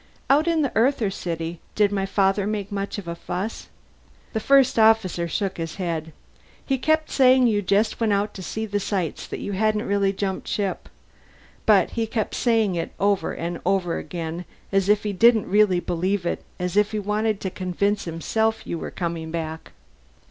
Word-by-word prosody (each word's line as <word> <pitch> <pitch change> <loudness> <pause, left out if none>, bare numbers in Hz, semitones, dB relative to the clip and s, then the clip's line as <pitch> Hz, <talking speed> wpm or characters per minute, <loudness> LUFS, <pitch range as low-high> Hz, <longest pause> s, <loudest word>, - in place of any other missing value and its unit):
"Out 300 +4 +4
in 330 -2 +2
the 275 - 0
Earther 230 -3 +2
city. 165 -2 -4 0.2
Did 205 -1 +3
my 195 -1 -1
father 195 0 +2
make 210 -1 -3
much 200 0 -3
of 200 -4 -7
a 170 - -2
fuss?" 180 +5 -5 0.7
The 220 - 0
First 270 +1 +4
Officer 220 -6 +3
shook 190 +3 -2
his 165 -1 -4
head. 165 -4 -3 0.5
"He 270 -2 0
kept 315 +3 +1
saying 260 -1 +5
you 210 -3 +2
just 205 +3 +1
went 225 -2 +1
out 205 +1 0
to 190 - -8
see 220 +4 -4
the 205 -1 -1
sights, 190 -5 -2
that - - -6
you - - -4
hadn't 215 +2 +1
really 200 -1 +2
jumped 195 -1 -3
ship. 200 -2 -2 0.8
But - - +5
he 225 -1 -1
kept 220 -1 -2
saying 225 -5 +2
it 170 -1 -3
over 200 0 +1
and 170 0 -4
over 185 -3 0
again, 170 0 -5 0.3
as 195 0 +2
if 210 0 +4
he 210 -1 -2
didn't 225 +1 +4
really 200 -2 +4
believe 180 +2 -1
it, - - -2
as 180 0 -3
if 210 +1 +3
he - - 0
wanted 210 +1 0
to 190 - -3
convince 200 +3 -1
himself 220 +7 -1
you 170 - -4
were - - -5
coming 165 -2 -4
back." 160 -1 -5
200 Hz, 185 wpm, -24 LUFS, 180-220 Hz, 0.8 s, saying